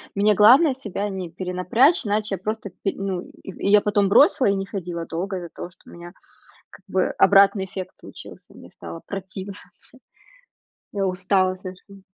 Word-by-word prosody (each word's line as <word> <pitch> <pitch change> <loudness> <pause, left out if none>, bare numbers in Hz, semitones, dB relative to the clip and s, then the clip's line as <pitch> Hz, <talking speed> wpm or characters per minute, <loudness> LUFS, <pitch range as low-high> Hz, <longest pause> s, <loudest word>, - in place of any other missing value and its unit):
мне 205 +1 +3
главное 255 - +6
себя 210 -5 -5
не 190 -3 -5
перенапрячь, 185 - +1
иначе 210 -1 -1
я - - -11
просто 215 +1 -4
пи",- 195 - +1
ну, 190 -2 -4
и 195 +1 -4
я 210 0 +6
потом 205 -1 +1
бросила 265 +3 +5
и 200 - +2
не 195 0 -3
ходила 175 -4 -5
долго 185 +4 -4
из-за 175 -2 -7
того, 175 - -9
что 180 - -21
у - - -14
меня, 175 0 -11 0.6
как - - -17
бы, - - +1
обратный 195 0 +5
эффект 190 -1 -7
случился, - - -13
мне - - -14
стало 85 0 -10
противно 195 0 -7 0.3
всё. - - -20 1.0
Я 200 -2 -1
устала, 185 0 +1
скажем. 185 +1 -12
195 Hz, 175 wpm, -22 LUFS, 185-205 Hz, 1.0 s, главное